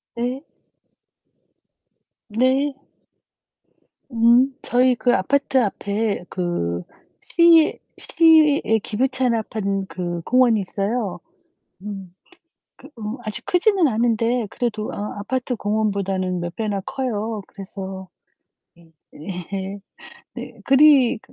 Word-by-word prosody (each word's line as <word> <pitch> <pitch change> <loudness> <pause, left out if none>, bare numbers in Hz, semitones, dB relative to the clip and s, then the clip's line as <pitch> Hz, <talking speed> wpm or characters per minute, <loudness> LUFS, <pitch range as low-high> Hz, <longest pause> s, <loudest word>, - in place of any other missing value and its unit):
네. 250 +4 -3 1.9
네. 260 +6 +1 1.4
음 235 +3 +4
저희 250 0 +3
그 245 +2 +1
아파트 280 0 +1
앞에 205 -1 -2
그 90 - -2 0.5
시 335 -2 +5 0.2
시에 315 -3 +4 0.2
기부 240 +5 0
차납한 220 -6 -1
그 175 -2 -4
공원이 245 +2 +3
있어요. 200 +2 -3 0.6
음 195 -3 -8 0.6
그 - - -15
어 220 +3 -5
아직 220 +1 -3
크지는 365 -1 +3
않은데 230 0 +1
그래도 220 -3 -3
어 210 +1 -5
아파트 255 +4 -2
공원보다는 200 -4 -1
몇 175 0 -5
배나 210 -3 -2
커요. 225 -4 -3
그래서 190 -1 -8 0.7
예. 170 -1 -21 0.2
네. 190 +4 -6 0.6
네. - - -9
그리 270 -4 +5
220 Hz, 175 characters per minute, -22 LUFS, 195-255 Hz, 1.9 s, 시